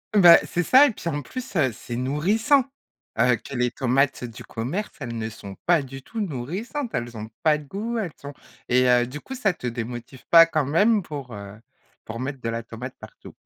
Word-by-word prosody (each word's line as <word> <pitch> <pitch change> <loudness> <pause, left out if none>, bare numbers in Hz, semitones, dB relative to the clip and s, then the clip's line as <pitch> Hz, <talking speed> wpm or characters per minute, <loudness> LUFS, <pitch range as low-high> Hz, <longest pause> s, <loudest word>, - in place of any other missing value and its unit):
Bah, 175 -4 +9
c'est 175 - -1
ça 260 - +7
et 290 - +2
puis, 170 - -5
en 145 -2 -2
plus, 255 - -8
heu, 140 -7 +3
c'est 120 +1 -7
nourrissant. 195 - +2 0.6
Heu, 125 -1 +5
que 140 - -9
les 125 -1 +1
tomates 135 +1 +1
du 115 -2 -8
commerce, 140 - -4
elles 120 -4 -5
ne 110 0 -3
sont 100 -3 -10
pas 170 -3 +4
du 135 0 -9
tout 225 - -5
nourrissantes, 195 - -4
elles 120 -3 -3
ont 110 0 -7
pas 155 -1 +4
de 150 - -11
goût, 215 +10 -4
elles 200 -7 -2
sont 145 0 -8 0.4
et 125 +1 +4
heu, 125 -1 +4
du 140 +4 -7
coup, 265 - -8
ça 215 -7 +1
te 125 - -6
démotive 120 +2 -6
pas 165 -1 +9
quand 155 -3 0
même 205 - +3
pour, 140 -6 -7
heu, 100 0 -9 0.5
pour 115 +1 -6
mettre 135 +1 -4
de 115 - -2
la 115 0 -3
tomate 115 +3 -8
partout? - - -13
140 Hz, 215 wpm, -24 LUFS, 120-180 Hz, 0.6 s, Bah